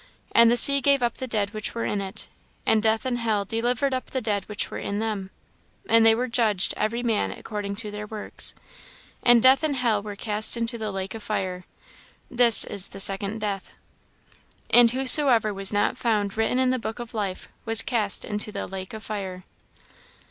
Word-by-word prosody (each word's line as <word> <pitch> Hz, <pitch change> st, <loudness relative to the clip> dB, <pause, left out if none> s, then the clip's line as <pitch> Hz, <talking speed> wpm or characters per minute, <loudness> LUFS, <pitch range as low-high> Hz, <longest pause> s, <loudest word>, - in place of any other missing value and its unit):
And 230 Hz, 0 st, +6 dB
the 240 Hz, -, +2 dB
sea 280 Hz, +3 st, +6 dB
gave 280 Hz, -2 st, +2 dB
up 235 Hz, -1 st, -1 dB
the 260 Hz, -, -5 dB
dead 210 Hz, -3 st, -2 dB
which 215 Hz, +1 st, -6 dB
were 230 Hz, -, -3 dB
in 205 Hz, -, -2 dB
it; 190 Hz, 0 st, -5 dB, 0.4 s
and 220 Hz, -, +2 dB
death 220 Hz, +2 st, 0 dB
and 245 Hz, -2 st, -2 dB
hell 215 Hz, -3 st, -1 dB
delivered 240 Hz, +5 st, -1 dB
up 255 Hz, -, -4 dB
the 260 Hz, -, -3 dB
dead 210 Hz, -5 st, -3 dB
which 210 Hz, -1 st, -3 dB
were -, -, -6 dB
in 200 Hz, -, -4 dB
them: 210 Hz, -3 st, -4 dB, 0.6 s
and 230 Hz, 0 st, +4 dB
they 225 Hz, 0 st, +5 dB
were 250 Hz, +2 st, -2 dB
judged 220 Hz, -6 st, 0 dB
every 230 Hz, +3 st, -2 dB
man 225 Hz, -3 st, 0 dB
according 205 Hz, -2 st, -6 dB
to 210 Hz, 0 st, -7 dB
their 210 Hz, 0 st, -7 dB
works. 215 Hz, -1 st, -6 dB, 0.7 s
And 240 Hz, -2 st, +4 dB
death 260 Hz, +1 st, +5 dB
and 310 Hz, -3 st, -1 dB
hell 235 Hz, -5 st, 0 dB
were 205 Hz, 0 st, -8 dB
cast 215 Hz, +2 st, 0 dB
into 230 Hz, 0 st, -4 dB
the 215 Hz, -1 st, -4 dB
lake 190 Hz, 0 st, -5 dB
of 225 Hz, -, -8 dB
fire. 185 Hz, -4 st, -4 dB, 0.7 s
This 240 Hz, -3 st, +7 dB
is 200 Hz, -1 st, +5 dB
the 195 Hz, -, -12 dB
second 200 Hz, +2 st, +2 dB
death. 200 Hz, -2 st, -5 dB, 1.0 s
"And 240 Hz, -1 st, +7 dB
whosoever 255 Hz, -3 st, +4 dB
was 195 Hz, 0 st, +3 dB
not 205 Hz, +4 st, 0 dB
found 210 Hz, -5 st, -1 dB
written 225 Hz, +3 st, 0 dB
in 260 Hz, 0 st, +2 dB
the 255 Hz, -, -1 dB
book 220 Hz, -1 st, -6 dB
of 240 Hz, -2 st, -9 dB
life 200 Hz, -4 st, -4 dB, 0.2 s
was 225 Hz, -1 st, +2 dB
cast 215 Hz, -5 st, -1 dB
into 210 Hz, 0 st, -3 dB
the -, -, -5 dB
lake 190 Hz, +2 st, -8 dB
of 220 Hz, -, -10 dB
fire." 190 Hz, -3 st, -6 dB
220 Hz, 200 wpm, -24 LUFS, 205-240 Hz, 1.0 s, This